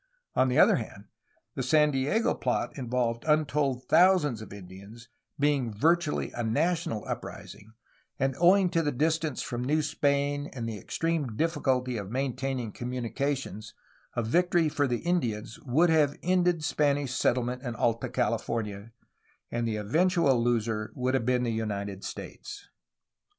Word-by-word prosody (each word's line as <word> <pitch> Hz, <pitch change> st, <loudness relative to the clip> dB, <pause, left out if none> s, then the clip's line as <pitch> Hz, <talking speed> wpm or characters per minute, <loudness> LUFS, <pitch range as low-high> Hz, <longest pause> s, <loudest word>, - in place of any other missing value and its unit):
On 130 Hz, -, +4 dB
the 125 Hz, -, 0 dB
other -, -, +6 dB
hand 105 Hz, -3 st, -7 dB, 0.5 s
the -, -, -3 dB
San 150 Hz, +3 st, +4 dB
Diego 145 Hz, +12 st, +1 dB
plot -, -, -2 dB
involved 120 Hz, -3 st, -1 dB
untold 145 Hz, -4 st, +1 dB
thousands 175 Hz, -, +4 dB
of 110 Hz, -, -10 dB
Indians, 100 Hz, +4 st, -12 dB, 0.3 s
being 140 Hz, -5 st, +1 dB
virtually 160 Hz, +8 st, +1 dB
a 120 Hz, -, -4 dB
national 145 Hz, 0 st, 0 dB
uprising, 110 Hz, +2 st, -7 dB, 0.4 s
and 135 Hz, 0 st, 0 dB
owing 180 Hz, +1 st, +5 dB
to 165 Hz, -, +2 dB
the 150 Hz, -2 st, 0 dB
distance 155 Hz, +1 st, 0 dB
from 120 Hz, 0 st, -4 dB
New 150 Hz, +4 st, +1 dB
Spain 145 Hz, -1 st, 0 dB
and 120 Hz, -4 st, -4 dB
the 110 Hz, -2 st, -5 dB
extreme 155 Hz, -, -2 dB
difficulty 130 Hz, -6 st, 0 dB
of 100 Hz, -2 st, -5 dB
maintaining 130 Hz, -1 st, -2 dB
communica 125 Hz, +3 st, -2 dB
tions 110 Hz, -4 st, -9 dB, 0.4 s
a 120 Hz, -, 0 dB
victory 170 Hz, +6 st, +2 dB
for 145 Hz, -1 st, 0 dB
the 120 Hz, -2 st, -1 dB
Indians 120 Hz, -11 st, -2 dB
would 160 Hz, +7 st, +4 dB
have 150 Hz, -3 st, +3 dB
ended 180 Hz, -2 st, +2 dB
Spanish 145 Hz, -2 st, +1 dB
settlement 125 Hz, -1 st, 0 dB
in 120 Hz, -4 st, -5 dB
Alta 115 Hz, +1 st, 0 dB
California, 105 Hz, -1 st, -2 dB, 0.3 s
— -, -, -39 dB
and 120 Hz, 0 st, -1 dB
the 110 Hz, -, -1 dB
eventual 140 Hz, -, +2 dB
loser 115 Hz, -2 st, 0 dB
would 130 Hz, 0 st, -1 dB
have 130 Hz, -3 st, 0 dB
been 125 Hz, -1 st, +2 dB
the 120 Hz, -, 0 dB
United 100 Hz, -3 st, -3 dB
States. -, -, -8 dB
130 Hz, 150 wpm, -28 LUFS, 115-150 Hz, 0.5 s, other